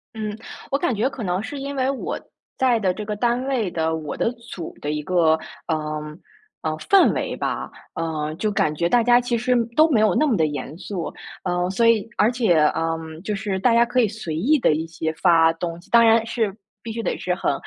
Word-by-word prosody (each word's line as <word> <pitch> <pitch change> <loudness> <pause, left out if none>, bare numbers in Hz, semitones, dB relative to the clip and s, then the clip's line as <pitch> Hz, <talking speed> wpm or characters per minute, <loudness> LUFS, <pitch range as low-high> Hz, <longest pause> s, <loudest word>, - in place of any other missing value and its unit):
嗯。 215 -1 -4 0.3
我 275 - +3
感 255 -4 0
觉 225 +6 +1
可 260 -4 -7
能 180 0 -1
是 275 +6 -6
因 280 +1 -5
为 260 -1 +1
我 275 - -3 0.4
在 250 -3 +3
的 190 -4 +1
这 210 +3 -6
个 210 0 -3
单 240 +3 0
位 245 -8 0
的， 160 -1 0
我 155 -2 -5
的 230 - +1
组 230 -8 -9
的 145 - -2
一 150 0 -2
个， 165 -1 +3 0.3
呃， 160 - +1 0.8
呃 155 - -1
氛 390 - +4
围 - - -2
吧， - - -3 0.2
嗯， 155 -2 -3
就 215 +3 0
感 195 -7 +1
觉 170 +3 0
大 240 +3 +4
家 245 +1 +5
其 240 -1 -1
实 250 +2 +1 0.2
都 315 +1 +6
没 235 -8 +3
有 215 - +3
那 310 - +3
么 250 - +2
地 160 -5 +2
严 145 0 -5
肃， 185 -2 -5 0.3
呃。 180 -1 0
所 230 +5 +2
以 225 -2 +3
而 215 +3 +4
且， 230 -8 +2 0.2
嗯， 160 0 -3
就 210 0 -2
是 195 -2 -2
大 235 +4 +3
家 235 +1 +5
可 250 +1 0
以 225 - +3
随 200 -7 -5
意 280 - +3
地 195 - +3
一 160 +2 -2
些 160 -1 -3
发 165 -1 +4
东 165 0 -5
西 - - -22
当 235 0 +7
然 225 0 +5
是 220 -4 -1 0.3
必 225 - -6
须 230 +1 -4
得 - - -1
是 180 - -1
很 180 - 0
210 Hz, 245 characters per minute, -22 LUFS, 165-235 Hz, 0.8 s, 当